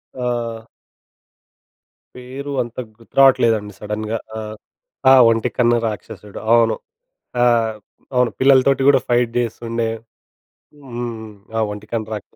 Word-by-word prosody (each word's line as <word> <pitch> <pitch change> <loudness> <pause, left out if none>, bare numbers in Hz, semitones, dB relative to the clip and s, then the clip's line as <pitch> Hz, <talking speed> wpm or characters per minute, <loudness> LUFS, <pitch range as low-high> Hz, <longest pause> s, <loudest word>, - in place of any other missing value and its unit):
ఆ! 120 -3 -3 1.5
పేరు 130 +3 -7
అంత 120 0 -12 0.2
గుర్తు 115 - -22
రావట్లేదండి 115 -6 +4
సడెన్‌గా. 105 +1 -3 0.2
ఆ! - - -3 0.7
ఆహ్, 130 -2 +8
ఒంటికన్ను 120 +1 +1
రాక్షసుడు. 105 -1 -7
అవును. 115 -1 +4 0.7
ఆహ్, 115 -2 +3 0.4
అవును 125 -1 +3
పిల్లలతోటి 135 0 +4
కూడా 135 -2 +4
ఫైట్ 120 -1 +2
జేస్తుండే. 115 0 -2 1.0
హ్మ్. 120 -3 -6 0.3
ఆ - - +2
ఒంటికన్ను 105 +1 -5
రాక్ష 105 - -9
115 Hz, 100 wpm, -19 LUFS, 110-125 Hz, 1.5 s, ఆహ్